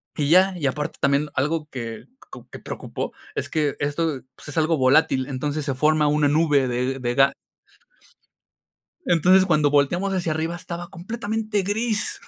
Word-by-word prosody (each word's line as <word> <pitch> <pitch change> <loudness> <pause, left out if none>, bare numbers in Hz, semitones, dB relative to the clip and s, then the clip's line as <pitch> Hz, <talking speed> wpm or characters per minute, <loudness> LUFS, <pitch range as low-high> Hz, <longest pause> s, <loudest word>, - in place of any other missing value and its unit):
Y 145 -1 -1
ya. 185 +3 +5
Y 155 - -3
aparte 150 +2 -3
también 140 +2 +2
algo 150 +3 -1
que 115 -4 -7 0.3
co - - -11
que - - -9
preocupó, - - -6 0.2
es - - -4
que 150 -3 0
esto, 145 -1 -1
pues, - - -11
es 145 - -7
algo 160 +1 +2
volátil, 130 0 +3
entonces, 145 +2 -3
se 140 - -1
forma 150 +3 +2
una 150 0 +2
nube 145 -2 +2
de 125 +2 -2
de 120 -1 -2
ga 135 +1 +4 1.7
Entonces, 185 +3 +4
cuando 155 -5 +3
volteamos 175 +7 +1
hacia 175 -4 -1
arriba 160 +2 -2
estaba 175 0 -7
completamente 215 +2 -3
gris. 215 +2 -1
150 Hz, 160 wpm, -23 LUFS, 140-175 Hz, 1.7 s, ya